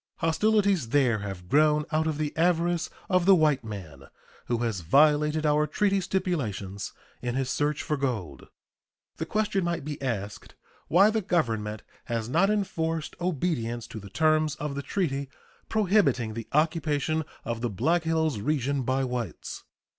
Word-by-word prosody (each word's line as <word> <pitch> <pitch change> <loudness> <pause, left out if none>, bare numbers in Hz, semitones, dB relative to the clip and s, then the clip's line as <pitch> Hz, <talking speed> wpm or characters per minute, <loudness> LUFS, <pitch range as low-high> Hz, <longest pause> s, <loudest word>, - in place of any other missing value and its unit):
Hostilities 195 - +2
there 125 -5 +3
have 95 -3 -6
grown 150 +4 +3
out 155 +1 +1
of 155 -2 -1
the 150 -1 -2
avarice 175 +1 +1 0.2
of 185 -1 +2
the 195 - +8
white 150 -6 +3
man, 90 -11 -8 0.4
who 120 - +1
has 115 -5 -1
violated 150 - +3
our 150 0 +3
treaty 195 +5 +1
stipulations 135 - -2 0.3
in 120 0 -2
his 135 -1 -1
search 150 +1 0
for 150 -2 -1
gold. 110 - -3 0.7
The 160 - -4
question 210 -2 0
might 170 -4 -2
be 150 -2 -5
asked 105 -6 -4 0.3
why 195 +6 +5
the 220 0 0
Government 110 - -1 0.2
has 115 -2 -2
not 170 +10 +3
enforced 165 -6 -1
obedience 135 -10 -1
to 110 - -7
the 100 -1 -11
terms 155 +4 +2
of 150 -1 -4
the 140 - -3
treaty 140 -5 -2 0.4
prohibiting 185 - +2
the 115 0 -6
occupation 155 0 +1 0.2
of 115 -1 -3
the 120 - 0
Black 165 - +1
Hills 160 -6 0
region 140 +2 0
by 130 +2 0
whites. 125 -8 -5
150 Hz, 155 wpm, -27 LUFS, 120-170 Hz, 0.7 s, the